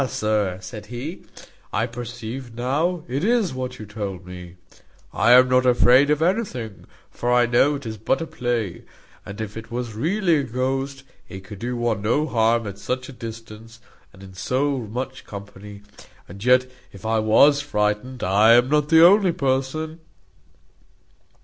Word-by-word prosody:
sir," 105 -4 -1
said 105 +3 -9
he, 130 - -6 0.5
"I 110 - 0
perceive 120 0 -7
now 150 +8 -1
it 135 +5 -3
is 225 - +1
what 130 -1 -5
you 110 - -8
told 100 -3 -6
me. 90 -1 -10 0.6
I 120 +4 +4
am 130 +1 +7
not 125 0 +3
afraid 125 +2 +5
of 150 +1 +2
anything; 165 - -2 0.2
for 120 - -2
I 125 0 +4
know 125 +5 +3
it 140 -2 -8
is 110 -1 -5
but 110 - 0
a 165 - -3
play. 120 - -3 0.4
And 100 +2 -8
if 105 -1 -5
it 110 0 -8
was 120 -1 -4
really 170 - +1
a 145 - 0
ghost, 135 +2 -3 0.3
it 95 +1 -9
could 100 0 -10
do 120 +2 -3
one 120 -4 -1
no 120 +9 +1
harm 115 -3 +1
at 100 -1 -7
such 130 +6 -4
a - - -9
distance, 115 -1 -10 0.3
and 95 -1 -15
in 95 -1 -12
so 130 +10 -1
much 125 +4 -6
company; 100 0 -10 0.4
and 100 +3 -10
yet 125 +1 +4 0.3
if 100 +2 -13
I 110 0 +1
was 140 +7 +5
frightened, 125 -1 -2
I 105 +5 +5
am 120 +2 +4
not 150 0 +1
the 165 +1 +7
only 195 0 +5
person." 140 +4 -2
120 Hz, 170 wpm, -22 LUFS, 105-135 Hz, 0.6 s, am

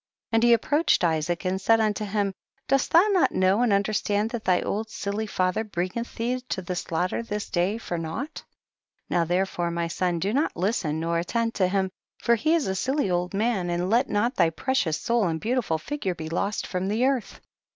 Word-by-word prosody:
30. - - 0
And 225 - +4
he 240 0 +6
approached 290 - +2
Isaac 165 +1 0
and 190 +1 -1
said 225 +4 +4
unto 215 -1 0
him, 200 -1 -1 0.3
dost 275 0 +2
thou 340 +4 +6
not 380 -4 +3
know 190 +4 +3
and 245 -3 +3
understand 205 +1 +1
that 235 -2 -5
tiiy 180 -1 +2
old 220 +2 -2
silly 210 +1 -3
father 185 +2 0
bringeth 205 +3 -4
thee 250 +2 -1
to 190 - -2
the 180 +1 -3
slaughter 175 +4 -1
this 210 -2 -5
day 185 +4 +1
for 175 -6 -4
nought? 200 - -4
3L - - -9 0.7
Now 170 -1 +2
therefore, 175 0 0
my 170 0 -1
son, 175 +1 -1
do 195 +6 -1
not 290 +5 0
listen 175 -5 0
nor 165 +1 0
attend 230 +6 -1
to 185 - +2
him, 190 0 0 0.3
for 235 - +2
he 310 +9 +2
is 325 - +1
a 190 - -1
silly 260 +1 0
old 180 +2 -1
man, 205 -4 0
and 175 +2 -1
let 245 +4 +3
not 210 +5 +1
thy 170 -3 +4
precious 165 - 0
soul 235 -4 +1
and 160 -1 -1
beautiful 230 -5 0
figure 190 - -3
be 160 -1 -6
lost 200 +5 -1
from 185 0 -2
the 220 +5 +1
earth. 265 -4 -1
200 Hz, 210 wpm, -26 LUFS, 175-230 Hz, 0.7 s, he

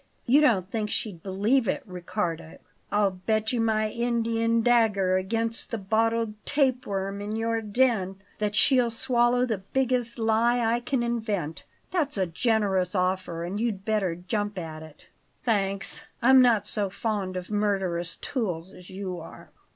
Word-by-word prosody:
You 275 +5 +5
don't 210 -11 +3
think 215 -2 -2
she'd 195 -7 -3
believe 210 +7 +1
it, 290 - -1
Riccardo? 175 -3 -4 0.3
I'll 205 -1 +3
bet 215 +5 -1
you 240 - +1
my 215 -1 +1
Indian 230 -1 +1
dagger 215 -6 +3
against 225 +4 -1
the 230 - -2
bottled 220 +1 0
tape 265 -3 +1
worm 195 0 -3
in 210 +1 -4
your 225 0 0
den 215 -3 +1 0.2
that 210 -1 -1
she'll 250 -2 +4
swallow 240 +1 +2
the 220 -5 -2
biggest 245 +3 -1
lie 225 +2 +2
I 230 +1 +2
can 245 0 -1
invent. 215 -9 -2 0.3
That's 325 - +1
a 190 - +2
generous 190 -1 +1
offer, 185 -2 -1
and 185 +4 -3
you'd 210 -5 -2
better 205 -6 0
jump 205 +3 -3
at 160 -3 -6
it." 155 -1 -14 0.4
"Thanks, 195 -4 -1
I'm 260 +1 +7
not 230 -5 +4
so 205 -2 0
fond 200 -2 -2
of 180 +2 -7
murderous 195 -5 0
tools 190 -8 -3
as 180 - -14
you 185 -2 -5
are." - - -12
215 Hz, 155 wpm, -26 LUFS, 190-235 Hz, 0.4 s, I'm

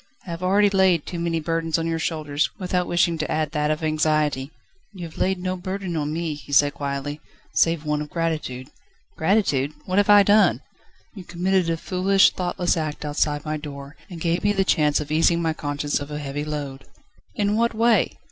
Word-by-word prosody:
"I 180 - -7
have 165 +1 -6
already 200 +2 +3
laid 190 -5 +3
too 175 - -5
many 170 -1 -1
burdens 165 0 -1
on 165 - -2
your 165 0 -1
shoulders, 155 -3 -1
without 180 -1 -1
wishing 170 -1 +1
to 155 - -2
add 155 -1 -1
that 150 -1 0
of 155 +1 -1
anxiety." 155 -3 +1 0.4
"You 180 -3 -7
have 160 - -11
laid 190 0 +1
no 185 +1 -3
burden 185 -1 -4
on 150 -1 -2
me," 165 0 -2
he 145 -1 -11
said 145 +1 +4
quietly, 140 +1 -4 0.3
"save 165 -2 +2
one 150 0 0
of 150 - -6
gratitude." 155 -6 -3 0.5
"Gratitude? 160 -6 +1
What 185 +2 +1
have 205 - +2
I 205 -1 +8
done?" 205 +2 +4 0.5
"You 195 -5 -9
committed 180 0 0
a 165 - 0
foolish, 190 +3 +3
thoughtless 180 0 -1
act 155 -2 -4
outside 145 0 -1
my 155 0 -2
door, 140 -1 -9
and 175 -3 -8
gave 170 +1 -1
me 205 0 +3
the 195 -1 +1
chance 150 -5 +2
of 150 -1 -6
easing 165 +2 +3
my 165 -1 0
conscience 145 -1 -2
of 145 0 -7
a 150 - -4
heavy 145 0 -4
load." 145 -3 -5 0.5
"In 205 0 +1
what 230 0 +1
way?" 230 0 +2
165 Hz, 200 wpm, -23 LUFS, 150-185 Hz, 0.5 s, I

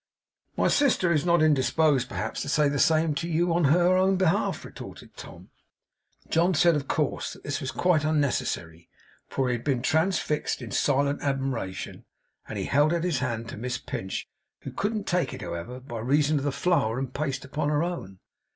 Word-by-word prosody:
'My - - +3
sister 250 -11 +3
is 155 +2 0
not 170 -2 +4
indisposed 145 -2 +3
perhaps - - -3
to - - -4
say 150 0 +3
the 140 0 -1
same 160 -1 +3
to 165 +4 -3
you 170 +1 +1
on 170 -2 +2
her 175 +5 +4
own 190 +1 +3
behalf,' 185 +2 +1
retorted - - -11
Tom. - - -12 0.8
John 175 +2 +2
said, 170 +1 +4
of 140 -2 -2
course, 150 - -1
that - - -15
this 145 - -3
was 130 - -3
quite 155 +5 +2
unnecessary, 125 - -1 0.4
for 135 -1 0
he - - +1
had 120 - -4
been 130 -4 0
transfixed 160 0 0
in 120 -5 -8
silent 140 +3 +1
admiration; 135 -9 -3 0.4
and - - -5
he - - -2
held 150 +4 +3
out 170 - -1
his 170 -7 0
hand 120 -3 -3
to - - -7
Miss 125 +3 -3
Pinch; 95 0 -5 0.3
who - - -7
couldn't 210 0 -2
take 180 0 0
it, - - -8
however, 85 +10 -6
by 125 -3 -7
reason 145 +5 +2
of 140 - -5
the 145 - +1
flour 130 -8 +1
and 130 -1 -4
paste 140 -2 -3
upon 145 +2 -2
her 150 +1 +1
own. 170 - -5
145 Hz, 190 wpm, -26 LUFS, 130-170 Hz, 0.8 s, not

